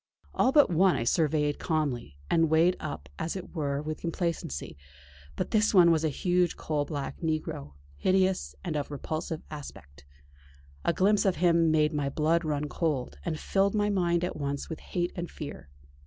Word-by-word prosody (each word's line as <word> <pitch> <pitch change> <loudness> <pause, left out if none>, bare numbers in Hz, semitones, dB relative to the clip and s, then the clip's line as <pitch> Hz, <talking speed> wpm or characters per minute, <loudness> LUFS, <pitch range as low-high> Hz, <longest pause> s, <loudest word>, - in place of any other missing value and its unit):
All 255 - +3
but 290 -8 +5
one 180 +1 +4
I 120 - -1
surveyed 150 +2 +1
calmly, 140 - -2
and 165 -1 +3
weighed 165 +3 +4
up 75 0 -6
as 165 - -2
it 185 - -7
were 145 -3 -2
with 155 0 -5
complacency; 170 - -3 0.6
but - - -3
this 215 -1 +3
one 175 -2 +8
was 160 -1 +2
a 160 - +2
huge 175 +4 +1
coal 150 -2 -1
black 140 -2 -5
negro, 155 - -3 0.2
hideous, 185 - +1
and - - -3
of 145 -1 -2
repulsive 155 +3 -4
aspect. 70 - -10 0.8
A - - +3
glimpse 200 +5 +3
of 190 -3 +2
him 170 -1 +3
made 155 0 +3
my 145 -2 0
blood 160 +4 +1
run 150 -1 -1
cold, 145 -4 -2
and 155 -3 -3
filled 195 +1 +1
my 210 0 +2
mind 175 -3 +1
at 180 - -2
once 140 -1 -3
with 160 - -5
hate 175 0 -2
and 175 -1 -4
fear. 145 - -8
160 Hz, 175 wpm, -28 LUFS, 145-175 Hz, 0.8 s, one